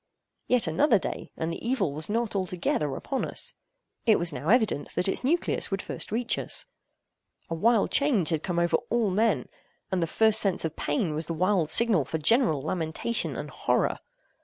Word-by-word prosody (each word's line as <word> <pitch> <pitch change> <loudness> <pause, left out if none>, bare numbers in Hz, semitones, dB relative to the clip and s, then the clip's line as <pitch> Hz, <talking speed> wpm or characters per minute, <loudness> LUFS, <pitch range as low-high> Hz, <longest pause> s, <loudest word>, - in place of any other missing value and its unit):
Yet 250 -4 +2
another 205 - +3
day—and 165 -3 -5
the - - -8
evil 235 - 0
was 155 +4 -6
not 230 0 -1
altogether 180 -6 -1
upon 270 - -3
us. - - -5 0.5
It 220 - +6
was 170 -2 +1
now 150 +3 -4
evident 220 - +1
that 180 - +2
its 190 - -1
nucleus 330 +7 0
would 195 - -2
first - - -5
reach 230 +2 0
us. - - 0 0.9
A - - 0
wild 220 +6 +2
change 250 - +2
had 160 -3 -1
come 175 -1 -3
over 170 -1 +2
all 230 -4 +1
men; 220 +5 +1 0.4
and 185 -2 0
the 165 - 0
first 220 +4 +4
sense 195 -4 +2
of 160 -1 -4
pain 150 +2 -1
was 155 +1 -2
the 165 - -3
wild 180 -2 +1
signal 220 -8 +4
for 150 +5 -4
general 160 - +2
lamentation 165 +8 -2
and - - -6
horror. - - 0
185 Hz, 185 wpm, -27 LUFS, 160-230 Hz, 0.9 s, It